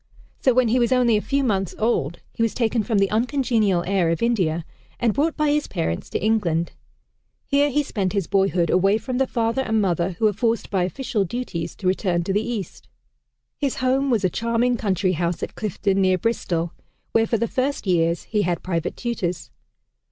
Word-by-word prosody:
So 260 - +3
when 250 -2 +4
he 250 +3 +3
was 235 0 +2
only 250 -3 +4
a 210 - +1
few 280 +4 0
months 195 -7 0
old, 175 - 0
he - - -5
was 230 -1 +1
taken 230 -2 +1
from 215 0 0
the 195 -1 +2
uncongenial 225 -6 +1
air 185 -3 +1
of 165 +6 -1
India 175 -9 +1 0.3
and 235 -3 +2
brought 310 +6 0
by 305 -1 +2
his 300 0 0
parents 80 +1 -3
to - - -1
England. 175 -7 +1 0.7
Here 285 +1 +2
he 295 +2 +1
spent 200 -9 -2
his 200 -4 0
boyhood, 190 -3 +1
away 195 +3 +3
from 250 +3 -3
the 270 - +2
father 230 +2 0
and 220 -4 0
mother 180 -2 0
who 200 +6 -1
were 210 - +4
forced 230 +3 -1
by 185 -3 +2
official 215 +1 -1
duties 175 -6 -4
to 195 - -10
return 185 -2 +1
to 195 - -2
the 205 - +2
East. 220 -6 -5 0.7
His 280 -3 0
home 265 +2 +1
was 225 -5 +1
a 185 - +3
charming 235 +4 +1
country 195 -4 0
house 170 0 -1
at - - -4
Clifton 195 -2 -1
near 185 -1 +3
Bristol, 175 -5 -1 0.4
where 225 0 +3
for 230 - +1
the 235 - 0
first 270 +2 -1
years 170 -2 +1
he 210 -2 -1
had 175 -3 -1
private 170 -2 -2
tutors. 210 - -3
215 Hz, 200 wpm, -23 LUFS, 180-240 Hz, 0.7 s, when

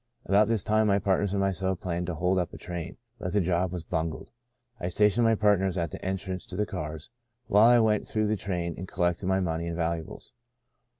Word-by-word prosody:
" - - -40
About 100 +2 +4
this 115 -4 +1
time 110 0 +2
my 100 -1 +4
partners 100 0 +1
and 100 - 0
myself 95 -1 0
planned 90 -1 -3
to 90 - -3
hold 90 +4 +1
up 90 - -2
a - - -9
train, 85 -2 -6 0.2
but 90 -3 -4
the 105 - +3
job 90 -1 +1
was 90 -3 -5
bungled. 80 -1 -3 0.5
I 90 - -3
stationed 105 +5 +3
my 115 0 +4
partners 100 -3 +2
at 85 -3 -1
the - - -8
entrance 95 -1 -4
to 90 - -8
the 105 +2 0
cars 80 - -6 0.3
while 105 +4 +6
I 120 - +7
went 110 -2 +2
through 110 -1 0
the 105 +1 +1
train 90 -4 -3
and 95 - -6
collected 90 +1 -1
the 95 0 +2
money 85 -2 -2
and 85 - -3
valuables. 85 -1 -4
95 Hz, 225 wpm, -28 LUFS, 85-105 Hz, 0.5 s, I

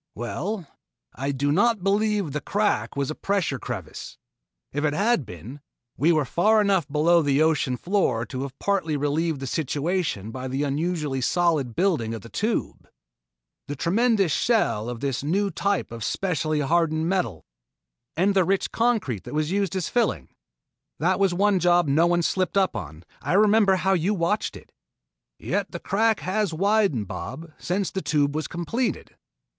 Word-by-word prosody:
"Well, 185 - -4 0.5
I 135 +3 -2
do 140 +1 0
not 210 +4 +2
believe 205 0 +1
that 150 - -6
the 150 +1 -3
crack 205 +7 0
was 140 0 -1
a - - -2
pressure 185 -8 -1
crevice. 105 -10 -7 0.6
If 145 +2 -2
it 150 -1 +1
had 205 - +1
been, 110 - -10 0.3
we 155 +6 +3
were 155 -4 +2
far 210 +11 +3
enough 195 -6 +2
below 165 +4 +3
the 145 0 +2
ocean 150 -5 +1
floor 155 - 0
to 130 0 -5
have 135 0 -6
partly 185 -7 0
relieved 145 +2 0
the 135 - -5
situation 145 - -2
by 130 +2 -5
the 135 +3 -2
unusually 150 -1 -1
solid 155 -5 +1
building 155 - +1
of 110 - -7
the 115 - -11
Tube. 220 - -2 0.8
The 145 - -4
tremendous 200 - +2
shell 145 - +1
of 120 -2 -6
this 135 -2 -2
new 195 +7 0
type 200 0 -1
of 115 -2 -6
specially 155 - -1
hardened 160 +1 +1
metal 180 - -1 0.3
" - - -60
"And 195 +4 +3
the 190 -1 +4
rich 195 +2 0
concrete 220 - 0
that - - -6
was 155 +1 0
used 195 -2 0
as 185 -3 -1
filling! 160 - 0 0.7
That 180 +5 +1
was 195 -2 +3
one 195 +2 +2
job 175 -1 +3
no 155 +5 +3
one 175 0 +2
slipped 185 +3 0
up 190 -1 +2
on. 80 +3 -7 0.2
I - - -1
remember 205 -1 +5
how 190 +1 +1
you 190 +4 +1
watched 185 +4 -1
it - - -17 0.4
" - - -63 0.2
"Yet 200 -1 -2
the 170 - -5
crack 220 +4 +1
has 190 -2 -1
widened, 195 - +2
Bob, 130 - -7
since 190 +2 -1
the 190 - -3
Tube 145 -1 +1
was 155 +1 -2
completed." 225 +9 -3
165 Hz, 175 wpm, -24 LUFS, 140-195 Hz, 0.8 s, remember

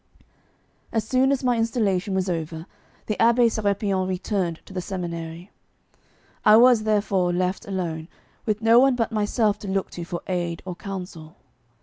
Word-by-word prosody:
As 225 -2 0
soon 260 +2 +3
as 275 -1 0
my 245 -2 +2
installation 205 -5 0
was 190 0 0
over, 160 -2 -3 0.4
the 215 - -2
Abbé 235 +1 +5
Sérapion 200 -3 0
returned 185 -2 -2
to - - -13
the 185 - -3
seminary. 170 -1 -6 0.9
I 215 - +7
was, 240 -2 +5
therefore, 200 -4 +1
left 185 +3 -1
alone, 170 -5 -3 0.4
with 215 0 -1
no 230 +1 +6
one 265 0 +4
but 235 -1 -1
myself 210 0 +1
to 205 - -8
look 195 0 -2
to 175 - -6
for 170 0 -6
aid 175 -3 -3
or 180 -2 -5
counsel. 180 -5 -8
195 Hz, 155 wpm, -24 LUFS, 175-220 Hz, 0.9 s, I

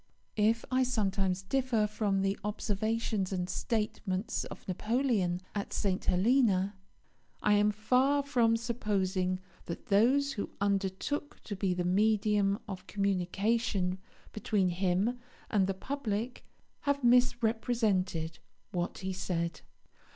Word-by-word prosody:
If 225 +2 +3
I 255 0 +3
sometimes 195 -6 0
differ 240 0 +1
from 205 -2 0
the 195 0 +1
observations 210 -1 -1
and 180 -2 -1
statements 210 -1 -2
of - - -10
Napoleon 205 -3 0
at 205 -1 -4
St. 190 -2 0
Helena, 200 -1 +3 0.7
I 210 - +4
am 205 0 +4
far 255 +7 +2
from 235 -5 +3
supposing 195 -6 -1 0.3
that 170 - -6
those 260 +8 +4
who 205 - -4
undertook 200 +9 -1
to 205 - -5
be 190 -2 0
the 180 - -1
medium 205 +1 +2
of 190 -2 -7
communication 195 0 0 0.3
between 205 -3 +1
him 190 +7 0 0.3
and 195 -3 +3
the 195 - -1
public 240 0 -3 0.3
have 285 -1 0
misrepresented 225 -8 +2 0.3
what 175 -1 -2
he 190 - -1
said. 170 -3 -2
205 Hz, 115 wpm, -31 LUFS, 190-230 Hz, 0.7 s, I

